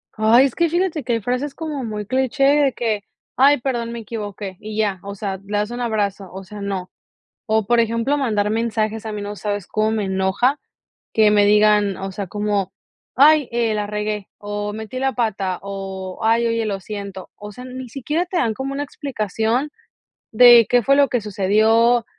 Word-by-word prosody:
Ay, 225 +4 +5
es 270 - -1
que 340 -1 +1
fíjate 345 -2 -1
que 240 0 -1
hay 230 - 0
frases 255 +6 -2
como 305 -4 -4
muy 210 -2 -4
cliché 260 +4 0
de 280 -1 +4
que: 220 -3 -1 0.3
"Ay, 280 +2 +5
perdón, 240 -2 -2
me 235 - -5
equivoqué", 205 -3 -6
y 215 0 -7
ya, 205 -4 0
o 200 0 -7
sea, 195 -1 -4
le 205 +1 -3
das 210 +2 -1
un 240 +1 -5
abrazo, 205 -4 -2
o 190 +1 -8
sea, 205 +2 -10
no. 195 -2 -4 0.6
O 220 -2 +1
por 240 +2 +3
ejemplo, 230 +5 0
mandar 215 -7 0
mensajes 220 -1 -1
a - - -3
mí, 210 - -5
no 205 0 -5
sabes 205 -2 -4
cómo 215 0 0
me 220 -2 -1
enoja, 190 +9 +1 0.5
que 215 -1 +4
me 205 -1 +5
digan, 210 -1 +4
o 195 0 -5
sea, 195 -1 -5
como: 205 -1 -1 0.4
"Ay, 295 +1 +6
eh, 235 -2 +1
la 210 -1 -2
regué, 210 -1 -3
o 205 0 -4
metí 220 +4 -6
la 270 0 0
pata, 200 -6 -1
o, 195 -1 -6
ay, 230 +1 +3
oye, 230 0 0
lo 200 -2 -2
siento". 200 -1 -7
O 210 0 -9
sea, 250 +5 -10
ni 255 0 -8
siquiera 295 +8 -2
te 365 0 -5
dan 230 -9 +1
como 265 +4 -4
una 285 +1 -2
explicación 240 -1 -2 0.6
de 240 0 +8
qué 245 -1 +3
fue 275 +3 +4
lo 285 -1 +5
que 245 - 0
sucedió, 220 +4 +3
220 Hz, 195 wpm, -20 LUFS, 205-250 Hz, 0.6 s, de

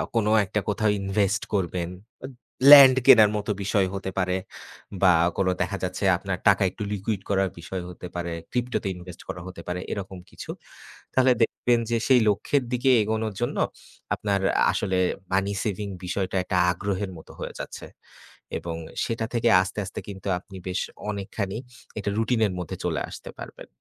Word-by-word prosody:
কোনো 110 -2 +2
একটা 105 +2 -1
কোথাও 110 +1 +1
invest 100 +1 +1
করবেন। 90 -3 -1 0.4
এদ 130 - -9 0.4
Land 135 -3 +11
কেনার 105 -2 +8
মতো 105 +1 -2
বিষয় 100 -1 +2
হতে 95 -1 -4
পারে 90 0 +1 0.7
বা 90 - +7 0.2
কোনো 95 -1 +2
দেখা 100 - -1
যাচ্ছে 90 +2 -3
আপনার 95 -1 -3
টাকা 100 0 +5
একটু 105 - -6
liquid 100 0 -2
করার 95 -1 +2
বিষয় 90 +2 -5
হতে 90 0 -8
পারে, 85 -1 -3 0.2
crypto-তে 125 -4 -1
invest 90 -1 -11
করা 90 - -5
হতে 90 -2 -9
পারে, 90 0 -2
এরকম 95 -2 -5
কিছু। - - -11 0.6
তাহলে 130 0 +4
দেখবেন 120 +1 +1
যে, 115 - +3
সেই 130 -3 +6
লক্ষ্যের 135 +7 +1
দিকে 125 +2 +2
এগোনোর 110 0 -2
জন্য 120 - -1 0.6
আপনার 100 -2 0 0.3
আসলে 95 -2 0 0.3
money 100 +1 +1
saving 100 -1 -3
বিষয়টা 95 +1 -2
একটা 90 0 -1
আগ্রহের 100 +1 -3
মতো 80 - -13
হয়ে - - -5
যাচ্ছে - - -7 0.7
এবং 85 -1 -5 0.3
সেটা 115 -1 -2
থেকে 120 0 +2
আস্তে, 95 +3 -4
আস্তে 95 - -6
কিন্তু 95 0 -8
আপনি 95 +1 -12
বেশ 90 +1 -1 0.3
অনেকখানি 100 0 -4 0.4
এটা 100 - -2
routine-এর 110 -4 +1
মধ্যে 90 - -5
চলে - - 0
আসতে - - -9
পারবেন। - - -9
100 Hz, 160 wpm, -25 LUFS, 95-110 Hz, 0.7 s, Land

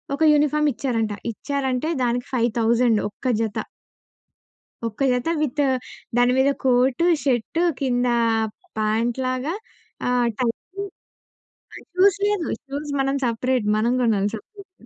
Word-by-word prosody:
ఒక 305 - 0
యూనిఫార్మ్ 300 0 +3
ఇచ్చారంట. 225 -4 -1 0.2
ఇచ్చారంటే 275 +3 -2
దానికి 245 0 -1
5,000 235 -1 +2
ఒక్క 210 +6 -7
జత. 220 -2 -2 1.3
ఒక్క 225 +2 -7
జత 250 +4 -1
విత్ 295 -1 -1 0.6
దాని 245 +1 +4
మీద 270 +1 +4
కోటు, 255 +4 +3 0.2
షర్టు 270 +5 0 0.2
కింద 250 -2 +1 0.7
ప్యాంట్ 220 +2 0
లాగా 255 +6 -1 0.5
ఆహ్, 245 -1 +2
టైయ్యి. 310 +11 -3 0.9
ఆహ్, - - -12
షూస్ 390 +1 +4
లేదు. 415 -6 0 0.2
షూస్ 285 +2 -5
మనం 270 +1 0
సెపరేట్, 245 0 0
మనం 230 +3 +2
గొనాలి 210 -4 +2
సెపరేట్‌గా. 390 - -14
250 Hz, 115 wpm, -23 LUFS, 235-290 Hz, 1.3 s, దాని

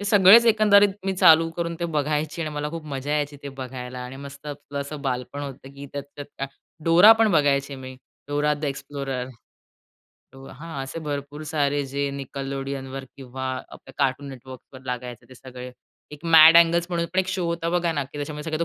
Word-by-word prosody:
ते 205 - -5
सगळेच 205 +3 +7
एकंदरीत 205 -2 +6 0.2
मी 195 - +1
चालू 165 -1 +6
करून 170 -1 -2
ते - - -1
बघायची 150 +2 -1
आणि 155 - -3
मला 150 0 -2
खूप 165 -1 -7
मजा 140 0 -5
यायची 145 -1 -1
ते 140 - -6
बघायला 125 -1 -7
आणि 130 +2 -8
मस्त 140 +2 -11
आपलं 145 -1 -6
असं 140 +1 -7
बालपण 130 +1 -3
होतं, 135 -1 -8
की 140 +1 -9
त्यात 140 -1 -5
ते 145 - -4
त्या 135 -1 -6 0.4
डोरा 175 +7 +8
पण 220 -2 +4
बघायची 140 -2 +2
मी. 130 0 -9 0.3
Dora 145 +1 +1
the 150 - -6
explorer. 135 -2 -4 1.0
तो 135 0 -13
हां, 150 0 -7
असे 135 +5 -7
भरपूर 145 0 -5
सारे 145 -2 0
जे 140 +1 -2
निकलोडियनवर 135 0 -5
किंवा 130 0 -7 0.3
आपल्या - - -13
कार्टून 140 0 0
नेटवर्कवर 130 0 -12
लागायचे 125 -1 -6
ते 130 - -14
सगळे 125 0 -10 0.4
एक 150 +3 -11
मॅड 165 0 +8
अँगल 170 0 +4
म्हणून 170 -1 -1
पण 185 - +1
एक 185 - -4
शो 185 -1 -2
होता 170 0 -2
बघा 175 -1 +1
ना, 145 -3 -2
की 145 +2 -11
त्याच्यामुळे 150 +2 -4
तो 170 - 0
145 Hz, 190 wpm, -24 LUFS, 135-165 Hz, 1.0 s, डोरा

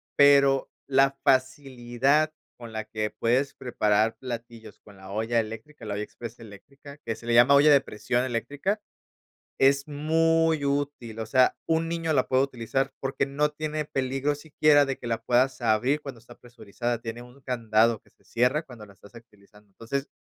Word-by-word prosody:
pero 140 -1 +5 0.2
la 135 0 +3
facilidad 130 +2 +1 0.3
con 115 -2 -10
la 110 0 -4
que 110 0 -3
puedes 125 +4 +1
preparar 110 -3 0
platillos 115 -3 -8
con 100 -2 -17
la 95 0 -13
olla 110 +3 0
eléctrica, 115 +4 -7
la 105 - -4
olla 105 - -3
exprés 120 +2 -10
eléctrica, 135 +7 -13
que 115 - -2
se 115 - -14
le 120 - 0
llama 120 +4 +6
olla 145 +2 +6
de 140 -2 +6
presión 120 0 -2
eléctrica, 140 - -2 0.8
es 140 +1 +3
muy 160 +1 +1
útil, 140 -5 -3
o 110 - -3
sea, 125 +3 +3
un 165 0 0
niño 165 -1 -1
la 130 -3 +2
puede 130 0 +3
utilizar 135 +1 -2
porque 135 +1 -1
no 145 +2 0
tiene 155 0 -4
peligro 135 0 -1
siquiera 145 -1 +3
de 135 -1 -3
que - - -11
la 115 -1 -2
puedas 125 +3 +1
abrir 120 +6 +1
cuando 135 -5 -9
está 120 +1 -16
presurizada, 120 0 -5
tiene 115 +1 -6
un 125 +3 -16
candado 115 -3 +1
que - - -27
se - - -34
cierra 125 +7 0
cuando 120 -7 -12
la 100 - -17
estás 100 +3 -19
utilizando. 105 -2 -18
Entonces, 115 +8 -5
125 Hz, 175 wpm, -26 LUFS, 115-140 Hz, 0.8 s, llama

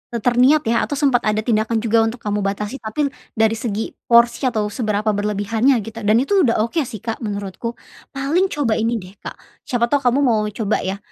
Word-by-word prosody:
terniat 250 +6 +3
ya, 230 +1 +1
atau - - -5
sempet 275 -4 +2
ada 215 0 +1
tindakan 220 -1 0
juga 230 0 +2
untuk 235 +2 -4
kamu 210 0 -2
batasi, 210 +6 -3
tapi 255 +7 -2 0.3
dari 220 0 +3
segi 220 -1 -3 0.2
porsi 235 +3 +4
atau 215 -4 -1
seberapa 215 -2 -1
berlebihannya, 210 +5 +1
gitu. 225 +2 -8
Dan 220 +3 +4
itu 395 +7 +2
udah 230 -3 +2
oke 235 +9 -1
sih, 215 - -8
Kak, 225 -1 -4
menurutku. 205 +1 -4 0.4
Paling 300 +8 +1
coba 285 -10 -1
ini 230 +2 0
deh, 185 +1 -12
Kak, - - -8 0.3
siapa 235 -1 0
tahu 285 - +3
kamu 245 +3 +3
mau 230 -4 +3 0.2
coba, 215 -2 0
ya. 190 +1 -2
225 Hz, 195 wpm, -20 LUFS, 215-250 Hz, 0.4 s, porsi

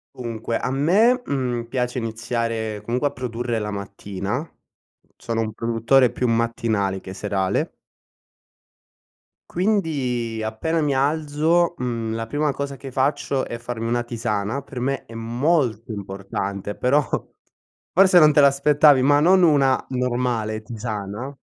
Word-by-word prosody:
Dunque 115 -1 -3
a 125 - -2
me, 205 - +3
mhmm, 125 -4 -1
piace 125 +1 -2
iniziare, 115 -1 -3
comunque, 125 +4 0
a - - -15
produrre 120 -1 -3
la 105 -1 -3
mattina. 100 +2 -4
Mhmm, 160 - -8 0.7
sono 115 -1 -3
un 110 -1 -3
produttore 115 +3 +2
più 125 - -1
mattinale 115 -4 0
che 95 - -8
serale. 95 -1 -1 1.8
Quindi 135 - -1
appena 160 +10 -1
mi 145 -2 +1
alzo, 155 +4 +1
mhmm, 115 -3 -3
la 115 0 -4
prima 145 +4 0
cosa 140 0 -4
che 135 0 -9
faccio 135 0 0
è 120 - -5
farmi 115 -1 -5
una 120 +1 0
tisana. 115 +1 -2
Per 130 -2 -8
me 135 +2 -2
è 115 - -13
molto 120 0 0
importante, 100 0 -5
però 140 +4 +3 0.9
forse 185 0 +6
non 155 -2 +7
te 145 - +5
l'aspettavi, 140 0 +5
ma 145 +2 +4
non 185 +4 +5
una 140 -6 +4
normale 120 -4 -1
tisana 110 +3 -5
120 Hz, 135 wpm, -22 LUFS, 110-140 Hz, 1.8 s, non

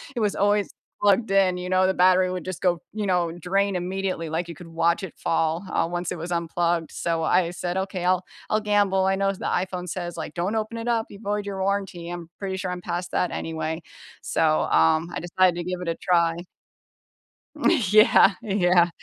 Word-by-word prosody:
it - - -2
was 205 -1 +1
always 205 0 +1 0.3
plugged 205 +1 +3
in, 190 -2 +4
you 180 0 -5
know, 185 0 +3
the 190 - +2
battery 185 0 +4
would 180 -1 -4
just 185 -2 -6
go 175 -2 +1
you 210 -1 -3
know, 175 -2 +1
drain 190 +3 0
immediately, 185 -2 -3
like 170 +2 -2
you 170 - -7
could 175 - -12
watch 165 +2 +1
it 185 - -6
fall, 165 +3 0
uh, - - +1
once 175 0 -3
it - - -3
was 165 +2 -6
unplugged, 170 0 0
so, 165 -1 -1
I 170 +1 +2
said, 175 +1 -3
"Okay, 190 -2 -3
I'll 185 0 +2 0.2
I'll 215 - +2
gamble." 205 -2 +2
I 190 0 +2
know 195 0 +1
s 195 - -3
the - - -7
iPhone 180 0 -2
says, 175 0 -5
like, 155 - -5
"Don't 180 +5 -2
open 220 +1 -3
it 230 +1 -3
up, 230 -1 +1
you 200 - -11
void 205 0 -2
your 195 -1 -4
warranty," 190 -3 -2
I'm 175 -1 -7
pretty 190 -1 -3
sure 185 - -3
I'm 180 0 -5
past 175 +1 -4
that 180 - 0
anyway, 160 0 -3 0.4
so, 155 -1 +1
um, 160 - +3
I - - -3
decided 180 0 +2
to 175 - -3
give 180 0 -4
it 175 - -5
a 165 - -1
try. 170 -2 +2 1.5
Yeah, 215 +1 +6
yeah. 180 -5 +3
180 Hz, 210 wpm, -24 LUFS, 170-195 Hz, 1.5 s, Yeah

